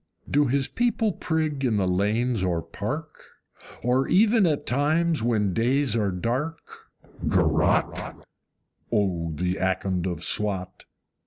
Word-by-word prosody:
Do 145 0 +2
his 135 +1 +1
people 235 -2 0
prig 155 -5 -2
in 115 -5 +1
the 95 -2 +1
lanes 105 +4 +1
or 85 -3 0
park? - - -6 0.6
Or 125 +2 +2
even 210 +1 +4
at 150 -3 -1
times, 155 +3 +1
when 110 -5 +1
days 125 +4 +1
are 105 -3 +1
dark, 125 - -4 0.4
GAROTTE? - - +1 0.7
O 90 -7 0
the 90 +4 -1
Akond 95 -1 -1
of 85 -2 -4
Swat! 95 -3 -1
120 Hz, 120 wpm, -25 LUFS, 95-145 Hz, 0.7 s, even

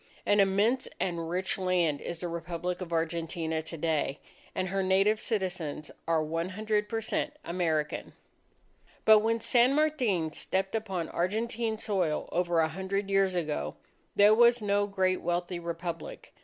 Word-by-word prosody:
An 205 0 +3
immense 200 +6 +3
and 170 -3 -2
rich 185 +2 -1
land 175 -5 +1
is 170 - -5
the 175 - -4
Republic 170 +2 -4
of 175 -2 -6
Argentina 165 0 -1
to 165 +1 -8
day; 155 -3 0 0.4
and 185 - -1
her 195 +1 0
native 195 +3 +3
citizens 180 - -2 0.2
are 165 -1 +2
one 165 +3 -2
hundred 210 +1 -1
per 225 +1 -1
cent 220 - -2
American! 160 -4 -1 0.9
But 220 -1 +8
when 225 +2 +1
San 245 +3 +4
Martin 250 - +1
stepped 190 0 -1
upon 195 -7 -2
Argentine 220 +4 -1
soil 185 -8 -1
over 175 -1 +2
a 160 - +2
hundred 195 +2 -3
years 195 -1 +3
ago, 150 - -2 0.4
there 205 +1 +7
was 240 +2 +6
no 205 -1 +1
great 190 -2 +1
wealthy 175 +1 -2
Republic. 170 -1 -6
185 Hz, 150 wpm, -29 LUFS, 165-210 Hz, 0.9 s, But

